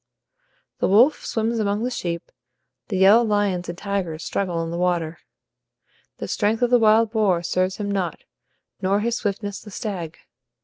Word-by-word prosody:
The - - +2
wolf 235 +10 +4
swims 225 +1 -1
among 205 +1 0
the 250 - -1
sheep, 170 -7 -4 0.6
the 195 - -2
yellow 200 +5 +6
lions 205 -5 0
and 175 - -5
tigers 180 -5 -3
struggle 175 -4 -2
in 165 - -5
the 170 - -3
water. 170 -2 0 1.0
The - - -5
strength 220 +3 0
of 245 - +2
the 245 - +6
wild 220 0 +4
boar 200 -6 +2
serves 185 +2 0
him 205 -1 -3
not, 185 -5 -2 0.6
nor 195 +2 +1
his 235 +2 0
swiftness 205 -3 -3
the 210 - -11
stag. 185 -6 -5
200 Hz, 165 wpm, -23 LUFS, 180-220 Hz, 1.0 s, yellow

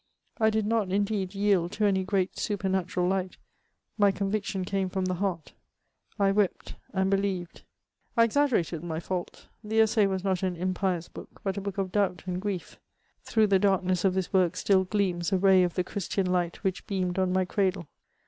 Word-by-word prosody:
I 220 -1 +4
did 220 -1 0
not, 215 -3 0
indeed, 200 -1 -1
yield 195 -3 +2
to 210 - +1
any 190 -2 +2
great 190 -1 0
supernatural 190 -3 -1
light; 190 -1 -1 0.6
my 205 -1 +5
conviction 195 -1 -2
came 190 0 -1
from 190 0 -2
the 185 - 0
heart; 180 -3 -3 0.6
I 200 -2 +3
wept, 200 -2 0 0.2
and 190 -1 +1
believed.'' 195 -3 -1 0.6
I 230 - +7
exaggerated 230 - +1
my 160 -2 -3
fault; 175 +1 -5 0.2
the 220 +1 0
Essai 220 -2 +4
was 190 -1 -2
not 190 -2 0
an 185 -2 -1
impious 180 -1 -1
book, - - -12
but 195 -1 -1
a - - -2
book 200 0 -5
of 190 -2 -2
doubt 195 -3 0
and 180 0 -3
grief. 200 -3 -4 0.4
Through 220 -1 +2
the 195 -2 +3
darkness 185 -2 +1
of 190 -2 +2
this 190 0 -2
work 180 -2 +3
still 190 -1 +2
gleams 185 -3 0
a 190 - +3
ray 190 0 +5
of 175 -2 0
the 180 - +1
Christian 195 +1 -2
light 180 0 -1
which 190 -2 -2
beamed 185 -2 -1
on 185 -1 +1
my 185 0 +2
cradle. 185 -2 0
190 Hz, 185 wpm, -28 LUFS, 180-200 Hz, 0.6 s, I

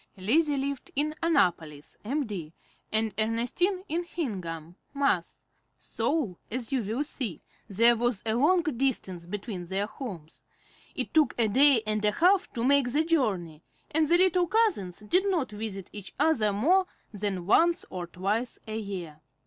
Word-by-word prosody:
Lizzie 285 - +2
lived 275 0 -3
in 300 +2 +1
Annapolis, 175 - 0
Md., 210 - -3 0.4
and 220 -1 +1
Ernestine 245 - 0
in 340 +1 -1
Hingham, 180 - -5 0.2
Mass., 280 0 -1 0.3
so, 265 - -2
as 240 +1 -4
you 265 -2 +1
will 225 +7 -2
see, 255 - -3 0.2
there 230 +3 +5
was 240 -2 -1
a 220 - +1
long 325 +9 +3
distance 240 - -2
between 195 -1 -5
their 190 +3 -1
homes. 195 - -9 0.5
It - - -2
took 305 -5 +3
a 230 -2 +3
day 260 +1 +5
and 215 0 -1
a 210 0 +2
half 365 - +3
to 235 - -3
make 275 -1 +3
the 300 +5 +2
journey, 200 - -1 0.3
and 310 0 +2
the 340 +3 +5
little 360 -1 +3
cousins 340 - 0
did 365 - +1
not 330 - -1
visit 205 -3 -6
each 205 -2 -9
other 225 -10 +3
more 350 - +2 0.3
than 195 -3 -3
once 335 - +3
or 180 -2 -5
twice 205 +8 -2
a 220 0 -3
year. 180 -7 -7
230 Hz, 155 wpm, -28 LUFS, 195-300 Hz, 0.5 s, there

